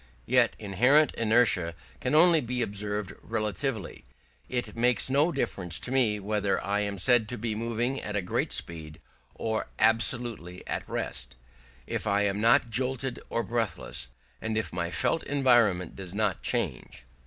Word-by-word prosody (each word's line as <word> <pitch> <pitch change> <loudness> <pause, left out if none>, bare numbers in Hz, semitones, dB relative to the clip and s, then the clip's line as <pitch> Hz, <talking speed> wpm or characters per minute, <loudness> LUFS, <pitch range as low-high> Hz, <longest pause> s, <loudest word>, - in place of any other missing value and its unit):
Yet 125 -1 +3
inherent 125 +9 +3
inertia 110 -7 +2 0.2
can 150 - 0
only 165 0 +6
be 125 -1 -2
observed 105 -1 -2
relatively: 110 -1 -3 0.5
it 125 -1 -3
makes 125 +2 +3
no 145 +5 +3
difference 90 - -1
to 125 - -6
me 120 -6 +2
whether 105 0 0
I 100 +1 0
am 100 -1 -2
said 115 +2 +3
to 120 - -5
be 115 0 -2
moving 115 +4 -2
at 105 - -5
a 100 - 0
great 90 - -1
speed 80 -2 -2 0.4
or 110 -1 -2
absolutely 115 -5 +1
at - - -4
rest, 60 0 -3 0.5
if - - -4
I 100 0 +2
am 100 0 0
not 115 +1 +4
jolted 130 +1 -2
or 115 - -1
breathless, 105 - -3 0.3
and 110 0 -2
if 110 - -2
my 85 -1 -2
felt 160 - 0
environment 120 - +2
does 95 -1 -8
not 105 -4 0
change. - - -3
110 Hz, 155 wpm, -28 LUFS, 100-125 Hz, 0.5 s, only